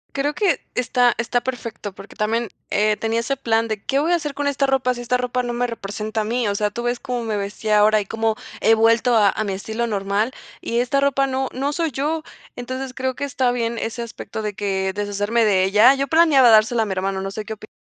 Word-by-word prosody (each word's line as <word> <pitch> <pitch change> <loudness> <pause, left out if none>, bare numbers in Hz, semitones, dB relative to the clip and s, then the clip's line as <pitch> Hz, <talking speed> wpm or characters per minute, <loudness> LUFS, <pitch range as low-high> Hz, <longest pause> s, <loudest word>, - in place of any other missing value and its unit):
Creo 290 +2 0
que 390 +1 +1
está 250 -1 +2
está 235 +1 0
perfecto, 230 -6 -5
porque 195 - -13
también, 225 +1 -1 0.2
eh, 210 +1 +2
tenía 225 +1 -1
ese 275 +4 -2
plan 225 0 +1
de: 215 -2 -4
"¿Qué 275 +1 0
voy 325 +4 +1
a - - +5
hacer 300 -4 -3
con 285 +1 -2
esta 280 0 +1
ropa 265 -2 +1
si 240 - -7
esta 245 +1 0
ropa 250 0 -1
no 240 - -3
me 245 +1 0
representa 215 -1 -4
a - - -1
mí?". 235 +1 -1
O 200 - 0
sea, 210 0 0
tú 235 +3 -5
ves 240 0 -1
cómo 250 -3 -3
me 215 -2 -2
vestía 210 +2 -1
ahora 215 0 +4
y 200 - -6
cómo 225 +1 -1 0.3
he 225 - +5
vuelto 230 +2 +3
a 210 -3 +5
a 215 - -2
mi 200 - -2
estilo 220 +5 -3
normal, 205 +2 -1 0.3
y 235 - -1
esta 250 +3 +1
ropa 275 -1 +2
no 265 0 -2
no 275 +3 -1
soy 330 -1 -1
yo. 305 +5 -2 0.3
Entonces, 255 +1 -5
creo 260 0 -2
que 285 - -3
está 260 -2 0
bien 235 -1 -2
ese 225 +1 -4
aspecto 230 -1 -6
de 210 -1 -3
que 190 -2 -1
deshacerme 205 +3 0
de 190 -3 +3
ella. 210 +7 +6
Yo 275 0 -1
planeaba 300 -6 +5
dárselo 220 +1 +5
a - - +1
mi 195 - -3
hermano, 190 +1 -2
no 195 0 -4
sé 215 +1 -6
qué 220 - -5
opi 215 0 -12
230 Hz, 245 wpm, -21 LUFS, 215-260 Hz, 0.3 s, ella